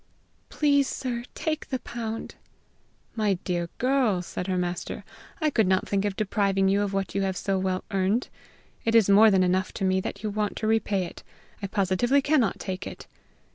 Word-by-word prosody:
Please, 285 -2 +3
sir, 240 -3 -3
take 310 -1 -2
the 260 - 0
pound." 225 -2 -5 0.8
"My 210 -3 +2
dear 175 -2 -2
girl," 250 -8 +2
said 180 +1 -5
her 185 -1 0
master, 175 0 -3 0.4
"I 310 -2 +1
could 220 -7 +3
not 185 0 +2
think 200 0 0
of 205 -2 -1
depriving 195 -2 +1
you 200 +1 +2
of 205 -1 -1
what 195 -1 -2
you 195 - 0
have 190 -1 -1
so 195 -1 0
well 185 0 -1
earned. 195 +5 +1 0.6
It 225 0 +1
is 215 -3 +6
more 215 +3 +8
than 190 -2 +4
enough 185 +1 +1
to 195 - -2
me 190 0 +2
that 200 +2 -6
you 215 - -1
want 210 0 -1
to 220 - -3
repay 215 -3 +1
it. - - -10 0.4
I 200 - -2
positively 200 +7 +2
cannot 270 - +2
take 185 0 -4
it." - - -9
200 Hz, 190 wpm, -26 LUFS, 190-230 Hz, 0.8 s, more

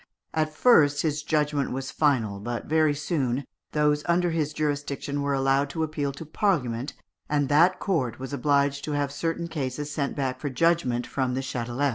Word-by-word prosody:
At 155 -1 0
first 155 -6 +4
his 150 -2 0
judgment 150 -3 0
was 135 +1 -4
final, 115 -10 +1
but 120 +3 -4
very 155 -1 +2
soon 140 -4 -1 0.3
those 150 -1 +2
under 175 0 +2
his 155 -2 0
jurisdiction 145 -1 -2
were 140 0 0
allowed 135 +1 +2
to 160 +2 -2
appeal 150 -3 -2
to 160 - -8
Parliament, 145 - 0 0.4
and 145 -2 +1
that 170 +5 +5
court 130 - -1
was 130 +2 -7
obliged 140 +1 +1
to 150 - -3
have 145 -1 0
certain 165 +3 -2
cases 150 -2 -4
sent 140 -2 -2
back 130 -2 -2
for 145 - -3
judgment 130 -4 +1
from 130 -2 -1
the 135 - -1
Châtelet. 130 +1 -1
145 Hz, 175 wpm, -26 LUFS, 135-155 Hz, 0.4 s, that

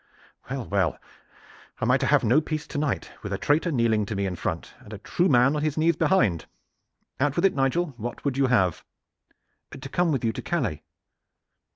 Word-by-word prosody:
"Well, 130 -2 -3
well, 95 -6 0 0.8
am - - +1
I - - +5
to - - 0
have - - +4
no 130 +8 +4
peace 155 0 -4
to 145 - -4
night, 150 -1 -2
with 100 - -6
a 100 - -1
traitor 150 - +1
kneeling 115 -6 +1
to 110 - -4
me 100 0 -1
in 95 -2 -3
front, 80 -1 -4
and 105 - -15
a - - -6
true 175 - 0
man 130 +1 +4
on 150 - -1
his 155 -1 -1
knees 165 +1 +3
behind? 110 - +2 0.7
Out 140 +1 +1
with 175 - +2
it, 195 - +4
Nigel. 140 +4 0
What 120 +4 -6
would 140 -3 0
you 135 -1 +2
have?" 95 -9 +2 1.0
"To 135 +1 -8
come 175 +3 +1
with 130 -5 -1
you 115 - +2
to - - -5
Calais." 125 - -2
135 Hz, 205 wpm, -25 LUFS, 105-155 Hz, 1.0 s, I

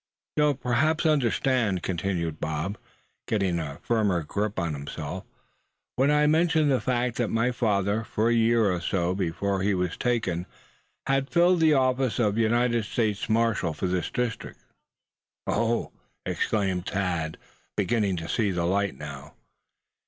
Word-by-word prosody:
"You'll 150 -1 +3
perhaps 140 +6 +1
understand, 130 -7 +2
suh," - - -7
continued 85 -3 -2
Bob, 80 +6 -3 0.5
getting 95 -6 0
a 70 -3 -5
firmer 105 -7 +1
grip 105 +6 -2
on 85 -4 -1
himself; 70 0 -6 0.7
"when 135 +3 +3
I 150 0 +4
mention 160 0 +3
the 130 -2 +2
fact 125 -2 0
that 120 - +1
my 115 +2 +1
father, 105 -2 0
for 110 +1 -1
a - - +3
year 115 -2 +3
or 90 -1 -2
so 90 0 0
before 95 +1 -1
he 100 0 +1
was 90 -1 -1
taken, 95 -8 -1 0.6
had 135 0 +1
filled 175 +1 +4
the 160 -2 +5
office 130 -2 +1
of 110 -2 +1
United 120 0 +2
States 105 -1 -1
Marshal 110 -7 +1
for - - -3
this 90 -1 -1
district." 125 -3 -4 0.8
"Oh!" 115 +2 0 0.3
exclaimed 95 -4 -1
Thad, 85 -5 -2 0.4
beginning 105 -2 +1
to 80 0 -5
see 105 0 +1
light 95 +3 0
now. 75 0 -9
105 Hz, 145 wpm, -26 LUFS, 90-125 Hz, 0.8 s, the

